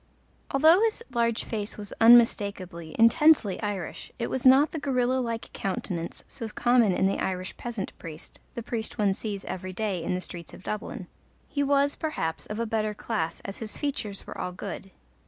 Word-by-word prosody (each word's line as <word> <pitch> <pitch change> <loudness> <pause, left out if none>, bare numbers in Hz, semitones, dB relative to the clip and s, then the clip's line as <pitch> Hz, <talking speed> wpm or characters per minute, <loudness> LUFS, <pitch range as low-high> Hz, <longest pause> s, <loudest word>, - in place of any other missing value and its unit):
Although 315 +7 +6
his 455 +1 +1
large 235 -1 +1
face 210 -2 -4
was 205 -1 -7
unmistakably, 200 -8 +4
intensely 230 - +5
Irish, 205 -5 -4
it 235 - -3
was 260 0 +2
not 270 +4 +7
the 320 - -3
gorilla 260 -2 +1
like 230 -2 -4
countenance 180 -3 -4
so 225 - -6
common 240 -1 +3
in 185 - +2
the 195 - +1
Irish 185 0 -3
peasant 230 -5 -5
priest 160 -2 -10 0.2
the 235 - -4
priest 230 -1 -4
one 205 -2 +3
sees 200 -1 -5
every 185 0 -5
day 200 -3 -2
in 180 - -1
the - - -1
streets 170 -2 -9
of - - -14
Dublin. 210 +2 -4 0.4
He 285 - -2
was, 285 0 +3
perhaps, 165 - -3
of 210 +1 -5
a 230 - 0
better 215 -1 -1
class, 205 -7 -3
as 195 - -5
his 220 -2 -5
features 245 -9 -3
were - - -8
all 180 - -4
good. 195 +1 -7
215 Hz, 180 wpm, -27 LUFS, 190-245 Hz, 0.4 s, not